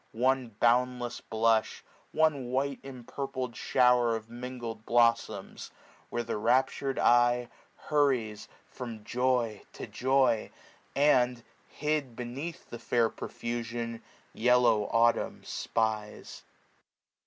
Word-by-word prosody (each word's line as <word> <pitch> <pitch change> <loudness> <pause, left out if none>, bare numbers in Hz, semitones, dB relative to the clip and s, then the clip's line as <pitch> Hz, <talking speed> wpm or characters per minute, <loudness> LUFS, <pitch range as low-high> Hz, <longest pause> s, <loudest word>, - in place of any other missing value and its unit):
One 130 -2 +1
boundless 125 0 +1
blush; 110 0 +1 0.3
one 150 -5 +1
white 135 +2 -1
empurpled 130 -1 -5
fhower 125 -2 +3
Of 110 0 -7
mingled 120 -2 -6
blolToms; 115 0 +1 0.4
where 120 - -2
the 115 -2 -3
raptur'd 130 +4 +1
eye 120 0 +4
no 125 - -6
SPRING. - - -23 0.4
Hurries 130 -8 +1 0.2
from 115 -4 -8
joy 125 -2 0
to - - -7
joy, 130 -3 +1 0.5
and, 125 -4 +3 0.2
hid 150 -5 -2
beneath 130 +8 -6
The 120 - -6
fair 115 -2 +1
profusion, 115 0 -5 0.3
yellow 120 -3 +3
Autumn 115 +2 +1
spies. 110 -2 -3
120 Hz, 105 wpm, -29 LUFS, 115-130 Hz, 0.5 s, eye